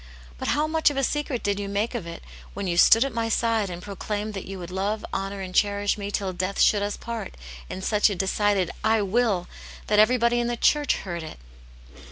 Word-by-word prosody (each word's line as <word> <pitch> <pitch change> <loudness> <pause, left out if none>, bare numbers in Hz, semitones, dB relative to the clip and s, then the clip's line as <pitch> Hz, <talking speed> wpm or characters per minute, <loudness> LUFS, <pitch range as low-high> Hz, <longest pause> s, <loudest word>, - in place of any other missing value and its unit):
But - - -4
how 300 +1 +2
much 315 0 +3
of 290 - -5
a 275 - +1
secret 290 -2 -1
did 205 0 0
you 200 -1 -4
make 205 +4 -1
of 220 -9 -4
it 170 - -8 0.3
when 200 0 -3
you 175 -2 -1
stood 225 +7 +6
at 275 - -4
my 230 0 -1
side 225 -3 +1
and 175 0 -7
proclaimed 210 +1 -4
that 195 - -6
you 195 0 -6
would 175 -1 -8
love, 200 +3 -2
honour, 195 0 -3
and 185 -1 -6
cherish 205 +1 +2
me 200 -1 -5
till 195 -2 -2
death 185 +2 -3
should 205 - +4
us 205 0 -2
part, 230 -4 -6 0.3
in 190 - -6
such 210 +1 +3
a 200 - -2
decided 195 0 +1
'I 220 -1 +3
will!' 200 -3 +1 0.4
that 210 -1 +2
every 240 +4 +5
body 235 0 +2
in 240 - 0
the 240 0 -2
church 295 +3 +3
heard 175 -3 -5
it 160 - -8
205 Hz, 230 wpm, -25 LUFS, 195-230 Hz, 0.4 s, stood